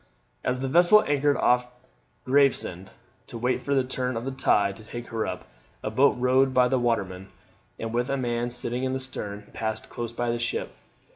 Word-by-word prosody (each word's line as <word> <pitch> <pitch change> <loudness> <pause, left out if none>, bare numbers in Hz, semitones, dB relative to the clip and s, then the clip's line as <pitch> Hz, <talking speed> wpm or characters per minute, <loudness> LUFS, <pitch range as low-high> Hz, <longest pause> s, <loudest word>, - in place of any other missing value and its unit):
As 125 0 -1
the 135 - -1
vessel 175 +9 +6
anchored 145 0 +2
off 125 0 +3 0.6
Gravesend 130 -9 +2 0.4
to - - -7
wait 125 +2 0
for 140 - -1
the 135 - +3
turn 125 -1 -2
of 115 - -4
the 135 - -2
tide 100 -7 +2
to 110 - -13
take 120 +2 -8
her 115 -1 -2
up, - - -5 0.4
a 110 - -2
boat 135 +6 +4
rowed 130 +1 +3
by 125 -1 +6
a 130 +1 +1
waterman, 95 -6 -1 0.5
and 115 0 -5
with 120 +1 0
a 140 - 0
man 120 -1 -1
sitting 120 +1 -3
in 130 0 0
the 130 - -1
stern, 105 -6 -6
passed 110 -1 -4
close 120 -1 -5
by 120 0 -1
the 120 - -2
ship. 120 - -2
125 Hz, 200 wpm, -26 LUFS, 115-130 Hz, 0.6 s, vessel